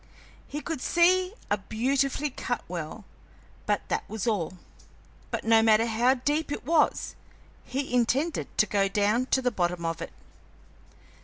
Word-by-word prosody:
He 295 Hz, -, -5 dB
could 315 Hz, -2 st, -4 dB
see 365 Hz, +5 st, +3 dB, 0.2 s
a 205 Hz, -, +2 dB
beautifully 270 Hz, +7 st, 0 dB
cut 245 Hz, -1 st, -3 dB
well, 175 Hz, +4 st, -6 dB, 0.6 s
but -, -, 0 dB
that -, -, 0 dB
was 220 Hz, -1 st, -4 dB
all. 185 Hz, -6 st, -1 dB, 0.7 s
But -, -, -3 dB
no 225 Hz, 0 st, +5 dB
matter 225 Hz, 0 st, +4 dB
how 235 Hz, +3 st, +3 dB
deep 290 Hz, +4 st, -1 dB
it 290 Hz, -, -4 dB
was, 315 Hz, 0 st, +2 dB, 0.5 s
he 270 Hz, 0 st, -3 dB
intended 260 Hz, +6 st, +1 dB
to 215 Hz, -, +5 dB
go 200 Hz, -2 st, +1 dB
down 210 Hz, +5 st, +1 dB
to 265 Hz, -, +1 dB
the 250 Hz, -, +2 dB
bottom 175 Hz, -4 st, -1 dB
of 165 Hz, 0 st, -2 dB
it. -, -, -6 dB
240 Hz, 150 wpm, -27 LUFS, 205-280 Hz, 0.7 s, no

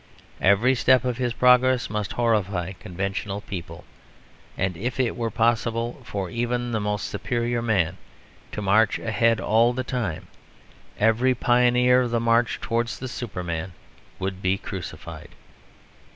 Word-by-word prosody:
Every 105 Hz, +7 st, +4 dB
step 130 Hz, 0 st, +3 dB
of 125 Hz, -2 st, -1 dB
his 125 Hz, -1 st, -1 dB
progress 125 Hz, +1 st, +4 dB
must 105 Hz, -2 st, -3 dB
horrify 100 Hz, -6 st, 0 dB
conventional 100 Hz, +2 st, -4 dB
people; 85 Hz, -5 st, -7 dB, 0.7 s
and 95 Hz, -1 st, -1 dB
if 125 Hz, +8 st, -4 dB
it 125 Hz, -3 st, +1 dB
were 115 Hz, -1 st, -2 dB
possible 115 Hz, +1 st, 0 dB
for 100 Hz, -2 st, -4 dB
even 120 Hz, +1 st, -2 dB
the 110 Hz, -, 0 dB
most 105 Hz, -1 st, -2 dB
superior 120 Hz, +2 st, -2 dB
man 95 Hz, -6 st, +1 dB, 0.6 s
to 105 Hz, -, -4 dB
march 105 Hz, +2 st, +3 dB
ahead 115 Hz, 0 st, +1 dB
all 115 Hz, +3 st, +3 dB
the 130 Hz, +1 st, -2 dB
time, 120 Hz, -11 st, -3 dB, 0.7 s
every 115 Hz, +4 st, +3 dB
pioneer 125 Hz, 0 st, +4 dB
of 125 Hz, -, -1 dB
the 115 Hz, 0 st, 0 dB
march 115 Hz, +1 st, +2 dB
towards 115 Hz, 0 st, -2 dB
the 130 Hz, -, -6 dB
Superman 90 Hz, -8 st, -5 dB, 0.4 s
would 95 Hz, 0 st, -4 dB
be 95 Hz, 0 st, +1 dB
crucified." 95 Hz, -2 st, -8 dB
115 Hz, 135 wpm, -24 LUFS, 100-120 Hz, 0.7 s, Every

